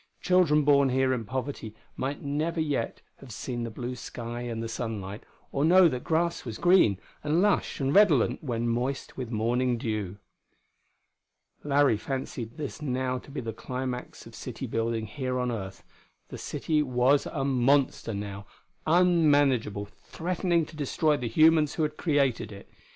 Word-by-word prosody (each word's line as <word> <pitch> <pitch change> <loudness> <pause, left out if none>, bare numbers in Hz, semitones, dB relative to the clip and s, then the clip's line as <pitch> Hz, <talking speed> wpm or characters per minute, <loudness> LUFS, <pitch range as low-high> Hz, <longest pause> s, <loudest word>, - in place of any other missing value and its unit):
Children 175 -5 +4
born 140 -1 +4
here 130 0 +2
in 115 -3 -3
poverty 130 -2 -5 0.2
might 140 +2 -3
never 155 +4 -1
yet 145 -7 -2
have 135 -3 -12
seen 120 +4 -4
the 115 - -3
blue 120 +3 -5
sky 120 -1 -6
and 115 -2 -4
the - - -3
sunlight, 110 -3 -5 0.3
or 140 - 0
know 180 +3 +7
that 125 -6 -3
grass 170 +1 0
was 115 -4 -6
green 175 - +4 0.3
and 150 +3 +1
lush 205 +1 +1
and 135 0 0
redolent 155 - +4
when 120 -4 -2
moist 125 +4 -2
with 125 -3 -5
morning 120 +2 0
dew.... 105 -4 -3 1.5
Larry 145 -5 +3
fancied 125 0 -5
this 150 0 -6
now 130 -2 -1
to - - -16
be 140 - -5
the 115 -2 -5
climax 125 +2 -5
of - - -13
city - - -6
building 115 0 -1
here 130 +3 -3
on 125 -1 0
earth; 95 -4 -6 0.5
the - - -7
city 155 -2 -1
was 130 +1 +2
a 135 -4 -2
monster, 130 -3 +2
now, 100 0 -6 0.4
unmanageable, 145 - +3
threatening 170 - -2
to 155 - -13
destroy 150 +1 +1
the 125 -4 -3
humans 155 +4 +4
who 160 - 0
had 150 0 -2
created 140 -9 +1
it.... 100 -1 -11
130 Hz, 160 wpm, -28 LUFS, 115-150 Hz, 1.5 s, know